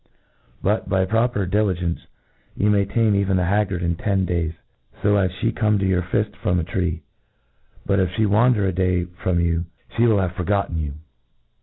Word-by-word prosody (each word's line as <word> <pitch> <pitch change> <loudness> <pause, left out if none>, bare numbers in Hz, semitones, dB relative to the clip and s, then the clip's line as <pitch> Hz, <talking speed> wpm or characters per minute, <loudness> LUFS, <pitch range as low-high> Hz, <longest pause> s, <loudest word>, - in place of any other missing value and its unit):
— - - -32
^but, 105 0 0
by 95 -1 +2
proper 115 0 +1
di 95 +4 +1
ligence, 90 -5 0 0.6
you 105 +1 +2
may 100 -1 +3
.tame 110 +1 +2
even 100 -1 +1
the 90 - +1
haggard 95 -2 0
in 85 0 0
ten 95 +1 0
days, 85 -2 -1 0.5
fo 105 0 +2
as 95 -2 +2
flie 110 +6 -1
Ihall - - -15
come 105 -2 +2
to 95 - 0
your 95 -2 +2
fill 90 +4 0 0.2
from 90 0 +1
a - - -1
tree. 85 -1 -2 0.8
Yet, 100 - +2
if 95 -1 +2
fhc 110 - 0
wander 105 +1 +3
a 95 - 0
day 90 0 +1 0.2
from 90 -2 +1
you, 85 0 0 0.3
flic 120 0 +4
will 110 - +4
have 90 -2 -1
forgotten 90 -2 -1
you. 75 -2 -3
95 Hz, 200 wpm, -22 LUFS, 90-105 Hz, 0.8 s, flic